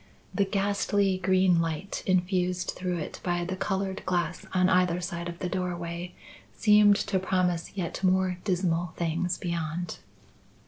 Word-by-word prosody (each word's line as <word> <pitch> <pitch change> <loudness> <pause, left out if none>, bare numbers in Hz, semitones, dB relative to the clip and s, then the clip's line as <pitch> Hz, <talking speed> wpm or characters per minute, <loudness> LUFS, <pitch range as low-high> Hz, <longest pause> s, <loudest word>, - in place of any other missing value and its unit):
The 200 - +2
ghastly 200 -1 +1
green 185 -1 +3
light 165 +4 -3
infused 180 -1 +1
through 180 -1 -2
it 155 - -6
by 175 -1 -1
the 185 +1 -3
coloured 195 0 -2
glass 175 -1 -1
on 185 -1 +3
either 180 -1 +3
side 175 -1 -4
of 170 - -7
the 180 - -3
doorway 175 -1 -4 0.4
seemed 210 -1 +6
to 195 -2 0
promise 180 -1 -1
yet 175 0 -3
more 185 -1 +2
dismal 175 -3 0
things 170 +2 -1
beyond. 170 0 -3
180 Hz, 140 wpm, -28 LUFS, 175-190 Hz, 0.4 s, seemed